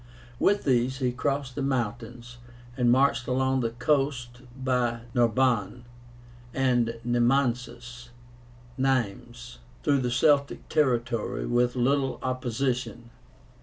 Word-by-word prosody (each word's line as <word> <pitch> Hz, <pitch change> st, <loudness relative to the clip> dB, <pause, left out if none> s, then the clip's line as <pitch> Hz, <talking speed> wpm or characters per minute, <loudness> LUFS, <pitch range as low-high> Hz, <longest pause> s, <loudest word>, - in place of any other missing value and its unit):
With 205 Hz, 0 st, +2 dB
these 130 Hz, -1 st, +1 dB
he 125 Hz, -2 st, 0 dB
crossed 140 Hz, +1 st, -2 dB
the 140 Hz, -, -4 dB
mountains, 120 Hz, -2 st, -3 dB, 0.4 s
and 125 Hz, -2 st, +2 dB
marched 130 Hz, -1 st, +2 dB
along 130 Hz, +1 st, +1 dB
the 115 Hz, -2 st, 0 dB
coast 125 Hz, -1 st, -1 dB, 0.2 s
by 125 Hz, -3 st, 0 dB
Narbo 120 Hz, -3 st, +2 dB
(Narbonne) 120 Hz, -3 st, 0 dB, 0.7 s
and 120 Hz, -3 st, +1 dB
Nemansus 120 Hz, 0 st, -1 dB, 0.7 s
(Nîmes), 115 Hz, -, -2 dB, 0.3 s
through 140 Hz, -1 st, +2 dB
the 125 Hz, -1 st, -1 dB
Celtic 140 Hz, +3 st, +2 dB
territory, 120 Hz, -7 st, 0 dB
with 120 Hz, +1 st, +1 dB
little 135 Hz, +2 st, +1 dB
opposition. 125 Hz, -1 st, -3 dB
125 Hz, 105 wpm, -26 LUFS, 120-135 Hz, 0.7 s, With